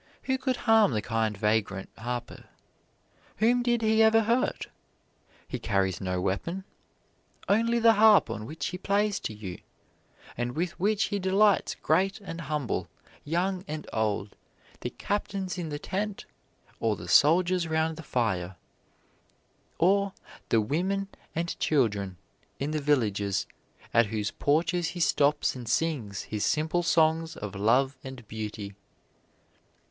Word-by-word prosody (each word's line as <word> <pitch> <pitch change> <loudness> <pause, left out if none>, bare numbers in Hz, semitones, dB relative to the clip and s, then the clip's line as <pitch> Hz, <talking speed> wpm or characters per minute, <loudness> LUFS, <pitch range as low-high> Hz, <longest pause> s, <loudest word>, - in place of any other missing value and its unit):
Who 265 -1 0
could 260 -1 -1
harm 220 - +5
the 105 - 0
kind 110 -2 -1
vagrant 105 -2 0
harper? 120 +1 -5 0.9
Whom 240 +3 +3
did 240 -1 +1
he 220 0 +4
ever 220 0 +6
hurt? 235 +3 0 0.8
He - - -4
carries 95 -2 0
no 90 -1 -1
weapon 100 - -2 0.8
only 230 +3 +3
the 230 -1 +6
harp 215 -1 +6
on 110 -1 -5
which 155 +4 -5
he 180 - -4
plays 200 +1 +1
to - - -4
you; 105 -4 -7 0.8
and 120 +1 -3
with 175 +2 -1
which 210 +3 +2
he 200 - +1
delights 195 +2 +3
great 195 +2 +2
and 170 -5 -7
humble, 145 - -2 0.4
young 180 +4 -1
and 155 -2 -5
old, 105 -2 -1 0.4
the - - -4
captains 195 -3 -3
in 165 -3 -4
the 145 - -3
tent 195 +6 -4 0.5
or 110 -2 +1
the 85 -1 -9
soldiers 175 - +4
round 160 0 0
the 165 - -8
fire, 95 - -1 1.2
or 195 +3 +3 0.4
the 115 - +4
women 190 - -1 0.3
and 170 +1 -2
children 100 - +1 0.4
in 140 +2 -2
the 155 -1 -1
villages 105 -9 +1 0.5
at 115 -2 +5
whose 105 -1 -2
porches 165 +4 +1
he - - -4
stops 150 -4 +2
and 120 -3 -7
sings 130 - -1
his 105 -1 -3
simple 155 +3 +1
songs 160 -1 +2
of 105 -2 -6
love 125 +7 +2
and 130 -4 -9
beauty." 105 -2 -6
155 Hz, 140 wpm, -28 LUFS, -, 1.2 s, ever